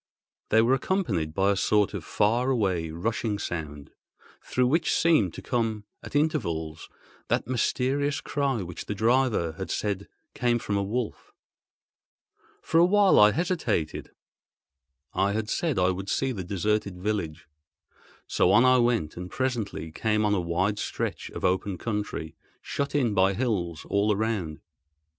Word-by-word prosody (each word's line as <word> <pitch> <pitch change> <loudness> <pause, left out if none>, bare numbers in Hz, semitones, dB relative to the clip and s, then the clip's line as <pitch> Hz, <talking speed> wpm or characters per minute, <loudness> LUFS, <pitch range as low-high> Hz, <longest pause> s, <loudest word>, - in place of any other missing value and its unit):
They 110 +1 +5
were 120 +3 +3
accompanied 130 - 0
by 95 +1 +3
a - - +1
sort 105 +1 +2
of 100 -5 -4
far 115 +9 +1
away 95 -10 0
rushing 105 +5 -2
sound, 75 -7 -5 0.5
through 125 - +1
which 160 +4 +2
seemed 155 - +3
to - - -8
come 115 -4 -1 0.2
at - - -10
intervals 85 - -1 0.4
that - - 0
mysterious 135 +4 0
cry 135 -7 -1
which 90 -1 -7
the 105 - -3
driver 115 -6 +2
had 95 - -4
said 100 -2 -2 0.3
came 120 -1 +1
from 110 -3 -3
a 100 - +1
wolf. 110 +3 -4 1.3
For 165 - +2
a 170 - +7
while 200 +1 +5
I 105 0 +7
hesitated. 165 - -1 1.0
I 100 +1 +1
had 110 0 -2
said 160 -5 0
I 90 0 +3
would 95 +2 -5
see 135 +4 0
the 100 -7 -4
deserted 100 +1 -1
village, 90 -6 -3 0.8
so - - +2
on 115 +5 +6
I 130 0 +5
went, 120 -10 +1
and 90 +1 -6
presently 115 -11 -3
came 105 +5 0
on 105 - +2
a 95 - +1
wide 90 +5 0
stretch - - -3
of - - -5
open 95 +1 0
country, 105 -7 -4 0.2
shut 140 +1 -3
in 125 -7 +2
by 95 0 +3
hills 95 -9 -2
all 100 +1 +2
around. 100 -7 -2
105 Hz, 150 wpm, -27 LUFS, 90-125 Hz, 1.3 s, a